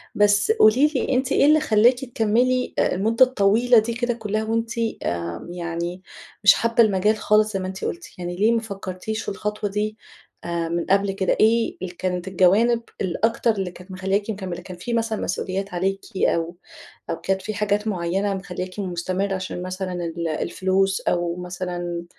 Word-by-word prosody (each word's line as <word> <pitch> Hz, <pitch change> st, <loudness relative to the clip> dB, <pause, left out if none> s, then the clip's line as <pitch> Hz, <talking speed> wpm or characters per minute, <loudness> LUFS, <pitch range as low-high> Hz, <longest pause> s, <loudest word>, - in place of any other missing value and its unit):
بس 205 Hz, -, +4 dB
قولي 265 Hz, -, +5 dB
لي، 265 Hz, -, 0 dB
أنتِ 260 Hz, 0 st, 0 dB
إيه -, -, +4 dB
اللي 305 Hz, +1 st, +6 dB
خلاكِ 245 Hz, -3 st, +4 dB
تكملي 245 Hz, +2 st, +1 dB
آآ، -, -, +2 dB
المدة 225 Hz, +6 st, +4 dB
الطويلة 235 Hz, 0 st, +4 dB
دي 225 Hz, +2 st, -2 dB
كده 240 Hz, +1 st, -1 dB
كلها 215 Hz, -1 st, -2 dB
وأنتِ 225 Hz, +1 st, -1 dB, 0.3 s
آمم، 85 Hz, -, -4 dB
يعني 170 Hz, +1 st, -4 dB, 0.4 s
مش 205 Hz, -, +9 dB
حابة 230 Hz, 0 st, +3 dB
المجال 210 Hz, +1 st, +2 dB
خالص 215 Hz, 0 st, +2 dB
زي 195 Hz, -, -1 dB
ما 185 Hz, -, -3 dB
أنتِ 190 Hz, +1 st, -5 dB
قلتِ؟ 345 Hz, +1 st, -4 dB
يعني 175 Hz, 0 st, -4 dB
ليه 210 Hz, +5 st, +3 dB
ما 230 Hz, -1 st, +1 dB
فكرتيش 200 Hz, 0 st, -5 dB
في -, -, -4 dB
الخطوة 210 Hz, +1 st, -3 dB
دي 210 Hz, +2 st, -2 dB, 0.5 s
آآ، 170 Hz, -1 st, -2 dB
من 170 Hz, 0 st, -1 dB
قبل 195 Hz, +1 st, +3 dB
كده؟ 195 Hz, -1 st, 0 dB
إيه 225 Hz, +1 st, +3 dB
ال 180 Hz, -1 st, -6 dB
كانت 180 Hz, 0 st, -2 dB
الجوانب 200 Hz, +6 st, +3 dB, 0.2 s
الأكتر 225 Hz, +6 st, +1 dB
اللي 195 Hz, -4 st, -3 dB
كانت 180 Hz, +2 st, -13 dB
مخلياكِ 195 Hz, +3 st, -1 dB
مكملة؟ 190 Hz, -4 st, -4 dB
كان 180 Hz, 0 st, -10 dB
في 235 Hz, +7 st, -4 dB
مثلًا 225 Hz, -2 st, -1 dB
مسؤوليات 190 Hz, +1 st, -3 dB
عليكِ 195 Hz, +2 st, -1 dB, 0.2 s
أو 170 Hz, -1 st, +1 dB, 0.5 s
أو 165 Hz, -, 0 dB
كانت 190 Hz, 0 st, 0 dB
في 215 Hz, -, -4 dB
حاجات 210 Hz, +1 st, 0 dB
معينة 195 Hz, +1 st, -1 dB
مخلياكِ 185 Hz, 0 st, -6 dB
مستمرة 185 Hz, +1 st, -2 dB
عشان 185 Hz, -1 st, -5 dB
مثلًا 185 Hz, 0 st, -4 dB
ال 170 Hz, -1 st, -3 dB
الفلوس 190 Hz, +4 st, 0 dB
أو 175 Hz, -1 st, 0 dB
مثلًا 175 Hz, -1 st, -5 dB
195 Hz, 175 wpm, -23 LUFS, 180-220 Hz, 0.5 s, مش